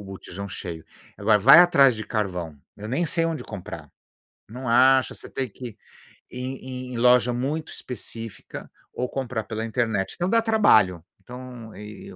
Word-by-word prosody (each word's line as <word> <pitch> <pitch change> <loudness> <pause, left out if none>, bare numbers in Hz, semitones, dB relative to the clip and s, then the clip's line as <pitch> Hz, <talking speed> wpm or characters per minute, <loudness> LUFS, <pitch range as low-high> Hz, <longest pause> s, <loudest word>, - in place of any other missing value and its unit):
o - - -12
botijão 95 0 -8
cheio. 85 -3 -7 0.3
Agora 105 +1 +3
vai 135 - +8
atrás 140 -8 +5
de 110 - -5
carvão, 90 -9 -3 0.2
eu 105 +1 -7
nem 165 +8 0
sei 165 +1 +1
onde 165 -2 -4
comprar, 100 -5 -9 0.6
não 125 +2 -7
acha, 130 +2 +4
você - - -8
tem 130 -3 -3
que 125 +4 -8
ir 105 - -17 0.5
em 130 0 -6
em - - -4
loja 125 0 +4
muito 145 +6 -3
específica 115 -2 -8 0.2
ou 125 - -2
comprar 130 -4 -3
pela 110 0 -4
internet. 110 -4 -1
Então, 175 +1 -1
dá 230 +1 +4
trabalho. 110 - +4 0.2
Então 125 -3 -10
e 105 0 -10
e - - -12
120 Hz, 170 wpm, -24 LUFS, 105-130 Hz, 0.6 s, vai